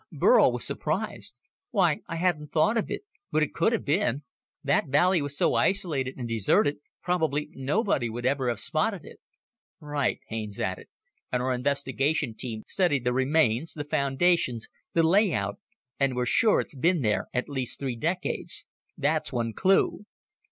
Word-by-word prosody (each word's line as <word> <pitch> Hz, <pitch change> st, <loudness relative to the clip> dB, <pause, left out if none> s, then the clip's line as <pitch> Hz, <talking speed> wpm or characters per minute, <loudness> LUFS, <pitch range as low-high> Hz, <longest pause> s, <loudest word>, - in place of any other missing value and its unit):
Burl -, -, +5 dB
was -, -, -3 dB
surprised. -, -, -2 dB, 0.3 s
"Why... 180 Hz, -8 st, +2 dB
I 165 Hz, -, -4 dB
hadn't 165 Hz, -4 st, -1 dB
thought 160 Hz, +8 st, +3 dB
of 225 Hz, -, 0 dB
it -, -, -4 dB, 0.3 s
but 155 Hz, -, +3 dB
it 150 Hz, -, -3 dB
could 170 Hz, +7 st, +2 dB
have 230 Hz, -, -1 dB
been. 145 Hz, -, +1 dB, 0.4 s
That -, -, +2 dB
valley 175 Hz, +5 st, +3 dB
was 145 Hz, 0 st, -4 dB
so -, -, +2 dB
isolated 150 Hz, -9 st, 0 dB
and 125 Hz, -2 st, -4 dB
deserted, 115 Hz, +6 st, +2 dB, 0.3 s
probably 160 Hz, -5 st, 0 dB
nobody 140 Hz, -, 0 dB
would 120 Hz, +2 st, -5 dB
ever 130 Hz, -1 st, +1 dB
have 120 Hz, -, -1 dB
spotted 180 Hz, +4 st, -1 dB
it. -, -, -13 dB, 0.6 s
"Right," 145 Hz, -4 st, -1 dB
Haines 110 Hz, -2 st, -5 dB
added, 95 Hz, 0 st, -3 dB, 0.4 s
"and 125 Hz, 0 st, 0 dB
our 130 Hz, 0 st, +1 dB
investigation 140 Hz, +1 st, 0 dB
team 110 Hz, -2 st, -5 dB
studied 170 Hz, -9 st, +1 dB
the 125 Hz, 0 st, +1 dB
remains, 130 Hz, +1 st, +1 dB
the 150 Hz, -, -4 dB
foundations, 140 Hz, -4 st, +1 dB, 0.2 s
the 165 Hz, -, +3 dB
layout, 160 Hz, -, +2 dB, 0.4 s
and 135 Hz, -2 st, +1 dB
we're 125 Hz, 0 st, 0 dB
sure 215 Hz, -, +4 dB
it's -, -, -10 dB
been 160 Hz, +3 st, +1 dB
there 105 Hz, -2 st, 0 dB
at 125 Hz, -, -2 dB
least 130 Hz, -4 st, -2 dB
three 130 Hz, -3 st, -3 dB
decades. 170 Hz, +9 st, -2 dB, 0.3 s
That's 155 Hz, +2 st, 0 dB
one 115 Hz, -3 st, -2 dB
clue. 195 Hz, -, +2 dB
145 Hz, 160 wpm, -27 LUFS, 125-170 Hz, 0.6 s, Burl